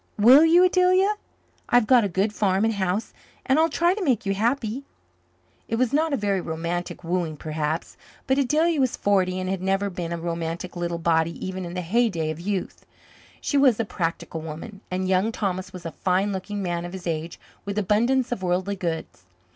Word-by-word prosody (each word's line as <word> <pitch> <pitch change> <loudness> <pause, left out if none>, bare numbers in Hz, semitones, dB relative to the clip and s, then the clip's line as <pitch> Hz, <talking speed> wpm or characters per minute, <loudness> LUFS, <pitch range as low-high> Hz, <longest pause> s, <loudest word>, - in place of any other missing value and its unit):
Will 250 +8 +8
you, 335 +2 +6
Adelia? 370 +2 +4 0.6
I've 245 -2 +4
got 245 0 +5
a 200 - 0
good 195 +4 0
farm 200 0 +1
and 225 - +1
house, 195 +1 -2 0.3
and 270 +3 +3
I'll 325 +1 +4
try 340 +3 +2
to 405 0 -3
make 255 - +1
you 195 - +1
happy." 230 +4 -1 0.8
It 225 - -1
was 250 +1 +1
not 315 +2 +2
a 280 - +1
very 200 -3 0
romantic 170 +2 -4
wooing, 170 -2 -2
perhaps. 155 +1 -3 0.3
But 265 +1 +2
Adelia 310 +4 +2
was 260 -3 +1
forty 185 -2 +1
and 185 - -3
had 190 -1 -2
never 195 +1 0
been 175 -2 -5
a 170 - -2
romantic 170 +1 -4
little 175 -1 -2
body 165 0 +1
even 185 -1 -4
in 175 +1 -7
the 180 - -2
heyday 180 -4 +1
of 155 - -7
youth. 190 +1 -3 0.6
She 285 - 0
was 260 -6 +4
a 230 - +1
practical 165 -3 -3
woman, 165 +6 -8
and 185 +1 -2
Young 190 +4 +2
Thomas 185 -4 -3
was 180 -2 -10
a 165 - -4
fine 190 +5 0
looking 195 +1 -4
man 175 -1 -2
of 175 +1 -7
his 190 -2 -8
age 165 0 -3 0.2
with 200 0 -5
abundance 235 +6 +2
of 245 - -2
worldly 185 +2 -1
goods. 165 - -4
190 Hz, 195 wpm, -24 LUFS, 175-235 Hz, 0.8 s, Will